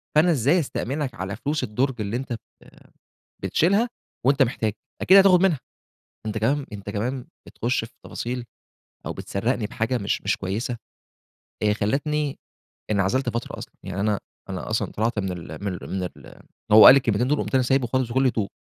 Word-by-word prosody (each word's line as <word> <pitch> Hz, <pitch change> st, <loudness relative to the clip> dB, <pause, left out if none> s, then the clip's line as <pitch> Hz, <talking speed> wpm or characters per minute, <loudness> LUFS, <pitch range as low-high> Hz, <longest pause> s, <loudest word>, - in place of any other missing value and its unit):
فأنا 165 Hz, +3 st, +5 dB
إزاي 145 Hz, +5 st, +3 dB
أستأمنك 140 Hz, -2 st, -3 dB
على 95 Hz, -2 st, -4 dB
فلوس 145 Hz, +6 st, -2 dB
الدُرج 125 Hz, +2 st, -1 dB
اللي 105 Hz, +4 st, -2 dB
أنت 130 Hz, -1 st, -4 dB
بت 115 Hz, -, -4 dB, 1.0 s
بتشيلها 195 Hz, -, +2 dB, 0.4 s
وأنت 135 Hz, +1 st, +5 dB
محتاج؟ 110 Hz, -4 st, -1 dB, 0.3 s
أكيد 190 Hz, +2 st, +7 dB
هتاخد 190 Hz, -2 st, +7 dB
منها." 170 Hz, -9 st, +3 dB, 0.7 s
أنت 110 Hz, 0 st, -2 dB
كمان 135 Hz, +6 st, +1 dB
أنت 100 Hz, 0 st, -6 dB
كمان 125 Hz, +5 st, -3 dB, 0.2 s
بتخشّ 120 Hz, 0 st, -1 dB
في 115 Hz, -, -12 dB
تفاصيل 125 Hz, +1 st, -4 dB, 0.6 s
أو -, -, -3 dB
بتسَرّقني 110 Hz, +2 st, -2 dB
بحاجة 115 Hz, +4 st, -1 dB
مش، 100 Hz, -, -1 dB
مش -, -, 0 dB
كويسة، 115 Hz, +6 st, -3 dB, 0.9 s
آآ، 105 Hz, -1 st, +4 dB
خلّتني 140 Hz, +7 st, -1 dB, 0.5 s
انعزلت 105 Hz, +6 st, +1 dB
فترة 115 Hz, +1 st, -4 dB
أصلًا، -, -, -9 dB
يعني 95 Hz, 0 st, -5 dB
أنا 105 Hz, -1 st, +1 dB, 0.3 s
أنا -, -, -5 dB
أصلًا -, -, -1 dB
طلعت 110 Hz, +1 st, -1 dB
من 95 Hz, -2 st, -2 dB
ال 90 Hz, +3 st, -7 dB
من 95 Hz, -, -1 dB
ال -, -, -8 dB
من 95 Hz, -1 st, -2 dB
ال 90 Hz, -, -9 dB, 0.3 s
هو 110 Hz, +1 st, +10 dB
قال -, -, +12 dB
لي -, -, +7 dB
الكلمتين 120 Hz, -2 st, +1 dB
دُول 150 Hz, +2 st, +1 dB
وقُمت -, -, -3 dB
أنا 130 Hz, -, +4 dB
سايبُه 130 Hz, 0 st, +2 dB
خالص 130 Hz, 0 st, 0 dB
بكُلّ 130 Hz, +2 st, +2 dB
هدوء، 110 Hz, -5 st, 0 dB
120 Hz, 175 wpm, -24 LUFS, 105-135 Hz, 1.0 s, قال